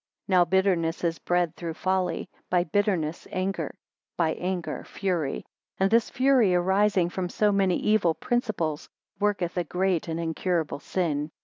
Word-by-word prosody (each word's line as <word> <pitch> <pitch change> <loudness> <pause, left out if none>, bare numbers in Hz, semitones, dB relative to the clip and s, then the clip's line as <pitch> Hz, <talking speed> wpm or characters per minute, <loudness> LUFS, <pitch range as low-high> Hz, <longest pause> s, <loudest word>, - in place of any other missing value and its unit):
Now 180 -2 +5
bitterness 180 -3 +1
is 165 -1 0
bred 175 -2 0
through 165 -2 -5
folly; 185 0 -1 0.2
by 180 -1 +3
bitterness, 175 -3 -1
anger; 190 +1 -2 0.4
by 165 -2 +2
anger, 180 -1 -3
fury; 175 -8 -2 0.3
and 195 +1 +2
this 230 -1 +3
fury 255 -8 +3
arising 190 0 +2
from 180 -1 -3
so 210 +3 +2
many 195 -3 +2
evil 200 -7 +2
principles, 210 -11 -2 0.3
worketh 200 -4 0
a 175 - +2
great 180 +1 0
and 165 0 -3
incurable 165 -2 -1
sin. 150 -3 -1
180 Hz, 140 wpm, -26 LUFS, 170-195 Hz, 0.4 s, Now